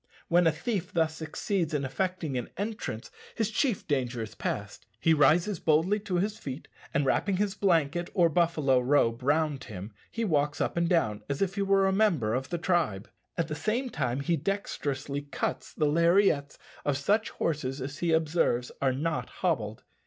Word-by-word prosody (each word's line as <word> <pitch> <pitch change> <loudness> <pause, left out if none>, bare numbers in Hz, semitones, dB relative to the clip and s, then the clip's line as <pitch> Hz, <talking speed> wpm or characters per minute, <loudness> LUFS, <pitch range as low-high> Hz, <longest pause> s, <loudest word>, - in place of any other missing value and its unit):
When 175 0 +5
a - - +5
thief 190 +1 -3
thus 160 -2 +1
succeeds 160 +1 -2
in 140 -2 0
effecting 170 0 -2
an 125 -2 -3
entrance, 200 - -4 0.2
his 220 -2 0
chief 240 -2 0
danger 125 -5 -1
is 110 - -8
past. 105 +1 -4
He 165 - +4
rises 165 +5 +3
boldly 165 +7 +3
to 200 -3 -3
his 200 +4 0
feet, 135 +1 -6 0.2
and 140 - +1
wrapping 190 +8 +1
his 205 0 0
blanket 175 -4 +1
or 175 -4 +5
buffalo 160 -6 +2
robe 125 -3 +2
round 145 0 +1
him, 100 -1 -8 0.2
he 230 0 -2
walks 150 -5 +1
up - - 0
and 170 0 +1
down 110 - +1
as 140 +1 -1
if 195 -1 0
he 200 - -2
were 195 0 +3
a 190 - +3
member 175 - +2
of 130 +2 -2
the 175 - -1
tribe. 165 - 0 0.3
At 165 -2 0
the 155 - -4
same 235 - -1
time 130 -2 -1
he 170 +4 +1
dexterously 145 -6 -2
cuts 145 -2 -3
the 155 - 0
lariats 170 -2 +3 0.3
of 145 -2 +1
such 205 +10 +1
horses 145 -4 -2
as 140 +3 -5
he 170 -1 +1
observes 160 -6 +1
are 135 -2 +2
not 155 +4 -2
hobbled. 115 - -2
160 Hz, 180 wpm, -29 LUFS, 135-185 Hz, 0.3 s, When